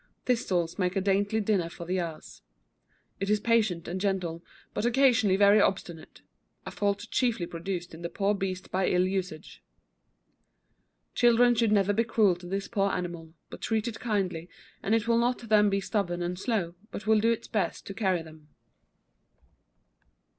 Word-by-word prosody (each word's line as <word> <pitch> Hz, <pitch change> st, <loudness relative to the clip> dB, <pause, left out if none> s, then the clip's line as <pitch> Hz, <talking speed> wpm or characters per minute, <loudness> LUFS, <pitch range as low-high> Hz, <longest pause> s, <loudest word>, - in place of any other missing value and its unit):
Thistles 180 Hz, -8 st, 0 dB
make 180 Hz, 0 st, 0 dB
a -, -, +2 dB
dainty 200 Hz, +3 st, +1 dB
dinner 200 Hz, -5 st, 0 dB
for 170 Hz, -, -9 dB
the 185 Hz, +2 st, -1 dB
ass. 165 Hz, -3 st, -7 dB, 0.8 s
It 195 Hz, -, -2 dB
is 210 Hz, 0 st, +3 dB
patient 210 Hz, -7 st, +1 dB
and 185 Hz, +2 st, -4 dB
gentle, 180 Hz, -4 st, -2 dB, 0.3 s
but -, -, -2 dB
occasionally 240 Hz, -5 st, +3 dB
very 200 Hz, +1 st, +6 dB
obstinate; 175 Hz, -5 st, -3 dB, 0.4 s
a -, -, -6 dB
fault 205 Hz, 0 st, -1 dB
chiefly 235 Hz, -8 st, +1 dB
produced 175 Hz, +1 st, -5 dB
in 160 Hz, -, -10 dB
the 170 Hz, -, -4 dB
poor 200 Hz, +2 st, 0 dB
beast 190 Hz, -2 st, -4 dB
by 190 Hz, 0 st, +1 dB
ill 180 Hz, 0 st, +3 dB
usuage. 185 Hz, -4 st, -4 dB, 1.5 s
Children 240 Hz, 0 st, +5 dB
should 230 Hz, -2 st, +1 dB
never 205 Hz, -1 st, +3 dB
be 225 Hz, +3 st, +2 dB
cruel 215 Hz, -5 st, +3 dB
to 175 Hz, 0 st, -11 dB
this 195 Hz, +2 st, -3 dB
poor 200 Hz, -3 st, 0 dB
animal, 170 Hz, -3 st, -5 dB, 0.2 s
but -, -, -9 dB
treat 220 Hz, 0 st, -1 dB
it 230 Hz, -, -5 dB
kindly, 185 Hz, -7 st, -2 dB, 0.3 s
and 215 Hz, -, +1 dB
it 225 Hz, 0 st, -1 dB
will 230 Hz, 0 st, +3 dB
not 245 Hz, +1 st, +1 dB
then 210 Hz, -1 st, +5 dB
be 195 Hz, 0 st, +1 dB
stubborn 190 Hz, -3 st, -2 dB
and 180 Hz, +1 st, -3 dB
slow, 195 Hz, -7 st, -1 dB, 0.2 s
but 200 Hz, -, -7 dB
will 220 Hz, 0 st, +4 dB
do 230 Hz, +2 st, +3 dB
its 230 Hz, -, -3 dB
best 215 Hz, -3 st, -2 dB
to 195 Hz, -, -6 dB
carry 190 Hz, -5 st, 0 dB
them. 155 Hz, -1 st, -15 dB
195 Hz, 170 wpm, -28 LUFS, 175-220 Hz, 1.5 s, very